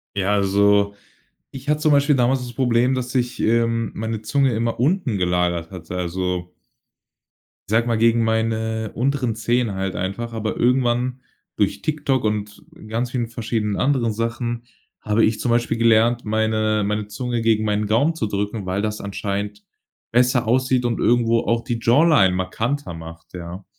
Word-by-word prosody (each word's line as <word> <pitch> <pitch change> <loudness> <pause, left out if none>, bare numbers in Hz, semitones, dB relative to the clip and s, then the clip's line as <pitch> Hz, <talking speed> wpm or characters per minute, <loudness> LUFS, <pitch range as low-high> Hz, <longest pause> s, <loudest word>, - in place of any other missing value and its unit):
Ja, 100 0 +1
also 100 0 +3 0.6
ich 135 +1 -9
hatte 150 0 +2
zum 155 -1 +4
Beispiel 140 0 +4
damals 130 +2 +2
das 125 -1 -7
Problem, 125 +1 +2
dass 125 -1 -3
sich, 125 -1 -1
ähm, 115 0 +1
meine 110 0 -4
Zunge 135 +4 +1
immer 115 +1 -1
unten 135 - +1
gelagert 90 -2 0
hatte, 90 -1 -7
also 90 0 -3 1.2
sage 115 +2 +2
mal, 115 -1 +1
gegen 115 0 +3
meine 110 -1 -1
unteren 125 -2 0
Zähne 120 -1 0
halt 95 0 -3
einfach. 110 +6 -4
Aber 110 -1 -3
irgendwann 125 0 +1 0.3
durch 100 -2 0
TikTok 145 -5 0
und 105 -1 -3 0.2
ganz 120 +3 -2
vielen 120 -3 -1
verschiedenen 110 -3 -2
anderen 130 -5 +1
Sachen 115 +1 -3 0.4
habe 105 +1 +2
ich 110 0 0
zum 120 - -1
Beispiel 120 0 +1
gelernt, 115 +1 +3
meine 110 0 +1
meine 105 0 -2
Zunge 120 +2 -3
gegen 110 -1 +2
meinen 105 0 0
Gaumen 130 +10 +2
zu 110 - -2
drücken, 105 0 -3
weil 95 +2 -1
das 105 0 -3
anscheinend 100 +1 -4 0.5
besser 125 0 +2
aussieht 130 0 +2
und 115 -2 -1
irgendwo 115 -1 +3
auch 115 0 0
die 115 -1 -3
Jawline 125 - +4
markanter 115 +5 -2
macht, 80 0 -11
ja. 90 +2 -8
115 Hz, 160 wpm, -21 LUFS, 105-120 Hz, 1.2 s, zum